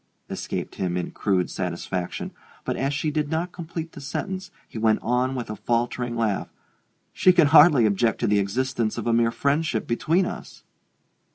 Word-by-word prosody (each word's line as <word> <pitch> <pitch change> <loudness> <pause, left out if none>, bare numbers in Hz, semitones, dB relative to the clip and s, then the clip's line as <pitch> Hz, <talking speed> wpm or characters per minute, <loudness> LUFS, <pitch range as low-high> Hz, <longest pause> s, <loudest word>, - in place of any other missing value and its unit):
escaped - - -4
him, 90 -2 -1
in 90 - -3
crude 95 -3 0
satisfaction; 90 0 -4 0.3
but - - -1
as 135 +1 -1
she 150 +2 -1
did 150 -1 -1
not 165 +3 -1
complete 165 -1 -6
the 145 - -10
sentence 185 +6 -4 0.2
he 110 - -7
went 110 -1 +3
on 125 +3 +1
with 120 -3 -4
a 105 - -5
faltering 120 +2 -1
laugh: 110 -4 -1 0.6
"She 185 - +5
can 175 -3 +5
hardly 150 -5 +7
object 110 +2 +1
to - - +2
the 105 0 +3
existence 115 +3 -1
of 115 - -4
a 120 - +2
mere 115 0 +3
friendship 140 -1 0
between 165 +10 +1
us!" - - -8
120 Hz, 175 wpm, -24 LUFS, 110-155 Hz, 0.6 s, hardly